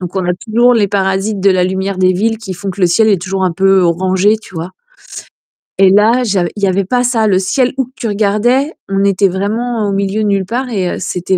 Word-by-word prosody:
donc, 180 0 -7
on 190 -1 -1
a 180 - 0
toujours 235 +5 +2
les 210 -4 +2
parasites 195 +1 -1
de 195 - +3
la 185 -1 +2
lumière 190 +1 -2
des 185 0 +3
villes 225 +5 0
qui 215 -4 -7
font 190 +2 -7
que 190 - -8
le - - +6
ciel 215 +6 +2
est 200 -5 +2
toujours 190 0 -2
un 180 - 0
peu 195 +2 +3
orangé, 185 +4 +1
tu 215 -3 -16
vois? 165 +2 -6 1.1
Et 195 -1 +5
là, 220 +5 +3
j'av 195 -6 0
il 205 - -7
y - - +4
avait 190 +1 0
pas 245 +5 0
ça. 230 -3 +1
Le 190 -3 +2
ciel 245 +7 0
où 265 - 0
que 255 - -23
tu 235 - -4
regardais, 215 +8 +1 0.2
on 195 0 0
était 200 0 +2
vraiment 215 +4 -2
au - - -1
milieu 200 +2 -1
de - - 0
nulle 200 -2 0
part 250 +6 -3
et 190 -6 -2
heu, - - -7
c'était 180 +1 -2
195 Hz, 255 wpm, -14 LUFS, 185-220 Hz, 1.1 s, le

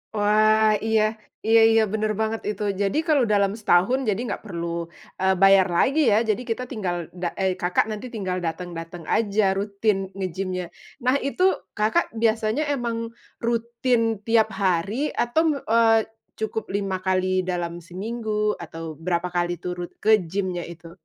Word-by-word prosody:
Wah, 215 +1 +4
iya 220 -1 +3 0.5
iya 225 0 +6
iya, 225 0 +5
benar 215 0 0
banget 220 0 -1
itu. 210 - -5 0.2
Jadi, 200 +6 0
kalau 290 -5 +4
dalam 200 -1 +3
setahun, 205 +6 +3
jadi 205 +2 0
enggak - - -4
perlu, 170 -4 -4 0.5
eee, 190 0 +3
bayar 195 -1 +6
lagi, 275 - +2
ya. 205 - +5
Jadi, 215 +4 +1
kita 240 +3 -1
tinggal 190 -7 -2 0.3
da 175 - -1
eee, 190 -1 +1
Kakak 180 +3 +1
nanti 215 +2 -5
tinggal 190 -5 -3
datang-datang 170 0 -5
aja, 200 -3 +2
rutin 200 +1 0
nge-gym-nya. 185 -1 -4 0.4
Nah, 255 +2 +4
itu 365 +6 -1 0.4
Kakak 220 +12 +2 0.2
biasanya 225 +5 +1
emang 235 -3 -2 0.4
rutin 235 -1 0
tiap 220 -2 +3
hari? 195 - 0
Atau, 240 +7 +1
me 290 - 0
eee, 225 -1 +3 0.3
cukup 220 0 -3
5 195 -2 -1
kali 185 0 +1
dalam 175 -2 -2
seminggu? 210 +4 -3
Atau, 165 -2 -8
berapa 175 +1 -1
kali 175 0 0
tuh 180 - -2
rut 175 - -5
ke 220 - +4 0.2
gym-nya 185 -1 -2
itu? 170 0 -11
205 Hz, 155 wpm, -24 LUFS, 180-225 Hz, 0.5 s, iya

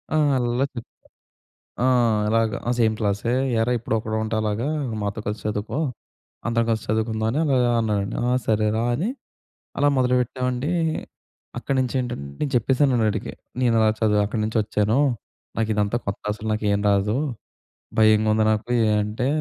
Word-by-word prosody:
"ఆ! - - +3 0.2
అల్లల్లా 120 +1 +1
చేప్ 120 -3 -7 1.0
ఆ! - - +4 0.4
అలాగా. 115 -1 +1
ఆ! - - +3
సేమ్ 110 -2 +3
క్లాసే. 105 +2 0 0.3
"ఏరా 120 +2 +1
ఎప్పుడు 115 - -2
ఒకడుంటే 110 +1 -2
అలాగా, 110 +4 -1 0.4
మాతో 100 +1 -3
కలిసి 105 0 -3
చదువుకో, 105 +6 -2 0.7
అందరం 115 0 +1
కలిసి 110 -2 -1
చదువుకుందాం 110 +2 0 0.2
అలా 125 -1 +3
అన్నాడండి." 105 -3 -1
"ఆ! - - +2 0.2
సరేరా", 110 +1 +1
అని 180 - -1 0.7
అలా 145 +1 +4
మొదలుపెట్టామండి. 125 +2 0 0.9
అక్కడి 135 - -2
నుంచి 130 0 -2
ఏంటంటే, 120 - -4
నేను 145 - 0
చెప్పేసానండి 125 -1 +2
ఆడికి, 105 -1 -4 0.3
నేను 120 -2 +3
ఇలా 110 - +4
చదువు 105 -2 +3
అక్కడి 110 +2 -3
నుంచొచ్చాను. 110 +1 +1 0.6
నాకు 110 -1 0
ఇదంతా 105 +2 +1
కొత్త 100 - -4
అసలు 105 +1 -7
నాకు 110 0 -2
ఏమి 100 0 0
రాదు. 100 +4 +1 0.8
భయంగా 110 0 +5
ఉంది 110 0 +2
నాకు 110 +3 -2 0.3
అంటే, 105 +4 -2
110 Hz, 145 wpm, -23 LUFS, 105-120 Hz, 1.0 s, భయంగా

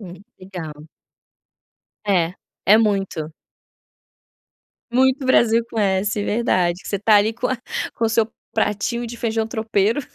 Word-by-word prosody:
Hum, 185 -1 -11
legal. 160 -5 -9 1.2
É, 180 -4 +2 0.3
é 210 +3 +7
muito. 195 -7 0 1.6
Muito 265 +2 +2
Brasil 235 -2 +4
com 225 - -4
s, 205 0 +1
verdade, 185 -6 +1
que - - -9
você 200 - 0
está 210 +2 +4
ali 210 +2 +3
com 245 +2 -2
a 260 - -1 0.4
com 230 - -1
o - - +1
seu 220 0 +2 0.3
pratinho 220 +3 -1
de 235 +1 -7
feijão 225 -1 -1
tropeiro, 220 +2 0
210 Hz, 135 wpm, -21 LUFS, 190-230 Hz, 1.6 s, é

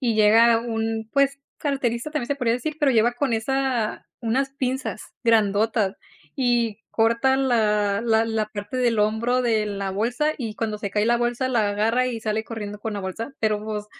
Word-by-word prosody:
y 240 -4 +1
llega 225 +2 +5
un, 225 -1 -3
pues, 275 0 +2 0.2
carterista, 270 -2 -2
también 300 -6 -2
se 285 - +1
podría 245 -4 +1
decir, 300 +5 -4
pero 290 -3 +3
lleva 235 +1 +3
con 255 0 -1
esa, 245 0 -1
unas 255 +4 0
pinzas, 265 -1 -3 0.2
grandotas 215 -2 +2 0.4
y 240 -4 +1
corta 235 +4 +2
la 210 -6 +2
la 225 -1 +3
la 220 -1 -1
parte 205 +3 -6
del 240 -3 +1
hombro 220 +4 +1
de 225 -3 +1
la 200 -2 -3
bolsa, 245 +9 0
y 225 -5 -5
cuando 220 -2 -2
se 205 -1 -5
cae 210 +2 +1
la 240 +1 +4
bolsa, 240 +2 -1
la 220 -5 +1
agarra 225 +5 +1
y 235 -3 -3
sale 220 0 -1
corriendo 210 -3 -6
con 220 +1 -4
la 205 - -4
bolsa, 210 +7 -5
pero 215 -1 0
pues, 210 -1 -4
230 Hz, 185 wpm, -23 LUFS, 215-250 Hz, 0.4 s, llega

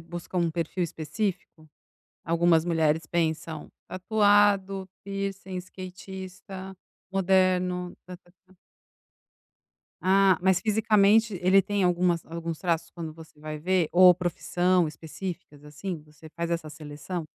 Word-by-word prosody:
busca 175 +2 -8
um 170 -2 +2
perfil 170 +2 -2
específico? 165 0 -4 0.6
Algumas 170 -1 +3
mulheres 160 -2 +1
pensam: 160 -2 -2 0.2
"Tatuado, 200 -1 +2
piercing, 195 -1 -5
skatista, 185 +1 -8 0.4
moderno, 185 -1 +1
tá, 180 -1 -8
tá, 175 - -26 0.2
tá". 190 - -23 1.5
Ah, 190 -1 +4
mas 190 -1 +3
fisicamente 215 -1 +3
ele 190 +2 +5
tem 200 +1 -1
algumas 175 -1 +2
alguns 165 -1 -5
traços 165 -2 -1
quando 165 -2 -6
você 160 -2 -15
vai 155 0 -6
ver? 175 +1 +1
Ou 180 0 +8
profissão 180 0 +1
específicas, 160 -1 -8
assim? 150 +2 -6
Você 150 +1 -15
faz 170 0 -3
essa 165 -2 -2
seleção? 155 +2 -7
180 Hz, 115 wpm, -27 LUFS, 165-190 Hz, 1.5 s, Ou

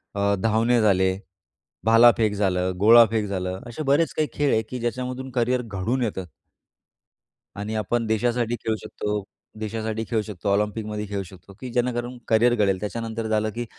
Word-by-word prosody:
अ, 100 0 +2
धावणे 115 +2 +2
झाले, 95 -2 +3 0.7
भालाफेक 115 -2 +5
झालं, 95 -2 0
गोळाफेक 110 0 +6
झालं. 95 -1 -3
असे 155 +7 -5
बरेच 160 +1 +2
काही 155 -1 0
खेळ 145 -1 +1
आहे, 110 - +3
की 125 - -5
ज्याच्यामधून 125 +2 -4
करियर 125 +1 +1
घडून 115 +3 -2
येतं 95 -4 -3 1.4
आणि 110 +2 -4
आपण 115 +2 -1
देशासाठी 120 +1 0
खेळू 110 - +1
शकतो 105 -1 -3 0.4
देशासाठी 110 +1 -3
खेळू 115 -2 +1
शकतो, 100 -2 -6
ऑलिम्पिकमध्ये 105 +1 -2
खेळू 100 -1 -3
शकतो, 95 +2 -15
की 130 - -6
जेणेकरून 120 0 -1
करियर 120 +2 +4
घडेल. 100 -4 +1
त्याच्यानंतर 115 +1 -4
झालं, 110 0 +1
की 120 +2 -4
110 Hz, 150 wpm, -24 LUFS, 105-120 Hz, 1.4 s, गोळाफेक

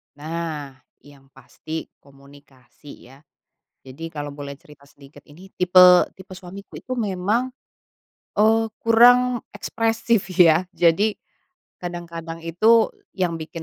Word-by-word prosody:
Nah, 155 -2 -5 0.3
yang 140 -2 -19
pasti 155 +4 -8 0.2
komunikasi 140 -1 -18
ya. 135 - -17 0.6
Jadi 135 +5 -9
kalau 145 -1 -5
boleh 140 0 -8
cerita 150 -2 -19
sedikit 140 0 -18
ini 180 +6 -16
tipe 180 0 +6
tipe 190 0 -16
suamiku 190 +2 -11
itu 255 - -6
memang, 215 +2 -1 0.9
eee, 225 +1 +3
kurang 245 +2 +4 0.2
ekspresif, 225 -2 -1
ya, 175 0 +5
jadi, 190 +4 +2 0.6
kadang-kadang 170 -2 -7
itu 215 +7 +3 0.2
yang 175 -3 -2
bikin 160 +1 -8
170 Hz, 110 wpm, -22 LUFS, 145-205 Hz, 0.9 s, tipe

